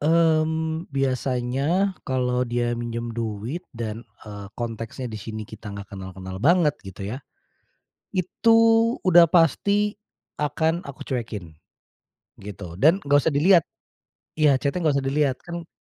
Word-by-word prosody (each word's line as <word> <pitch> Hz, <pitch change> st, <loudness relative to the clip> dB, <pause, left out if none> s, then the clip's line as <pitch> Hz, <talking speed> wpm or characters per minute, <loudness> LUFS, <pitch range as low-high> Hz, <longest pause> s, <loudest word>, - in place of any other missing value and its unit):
Mmm, 160 Hz, +1 st, +2 dB
biasanya 135 Hz, +6 st, 0 dB, 0.2 s
kalau 125 Hz, -1 st, 0 dB
dia 120 Hz, 0 st, 0 dB
minjem 120 Hz, 0 st, -4 dB
duit 115 Hz, -, -4 dB, 0.2 s
dan, 115 Hz, -1 st, -4 dB, 0.2 s
eee, 105 Hz, -2 st, -8 dB
konteksnya 115 Hz, +2 st, -5 dB
di 105 Hz, -, -6 dB
sini 110 Hz, 0 st, -6 dB
kita 110 Hz, 0 st, -10 dB
enggak 100 Hz, +1 st, -9 dB
kenal-kenal 95 Hz, 0 st, -7 dB
banget 165 Hz, -, +4 dB
gitu 95 Hz, -1 st, -9 dB
ya. 115 Hz, +8 st, -5 dB, 1.0 s
Itu, 190 Hz, +5 st, +3 dB, 0.5 s
udah 175 Hz, -2 st, +7 dB
pasti 200 Hz, +6 st, +2 dB, 0.4 s
akan 160 Hz, +3 st, 0 dB
aku 140 Hz, -, -8 dB
cuekin, 110 Hz, -, -4 dB, 0.9 s
gitu. 90 Hz, -3 st, -9 dB
Dan 165 Hz, -, +4 dB
enggak 145 Hz, 0 st, +4 dB
usah 160 Hz, -, +2 dB
dilihat 170 Hz, +3 st, +5 dB, 0.7 s
iya, 150 Hz, -3 st, +4 dB
chat-nya 140 Hz, +7 st, -2 dB
enggak 150 Hz, -3 st, +2 dB
usah 135 Hz, -, -2 dB
dilihat. 140 Hz, -1 st, +1 dB
Kan 170 Hz, -1 st, -6 dB
135 Hz, 130 wpm, -24 LUFS, 110-160 Hz, 1.0 s, udah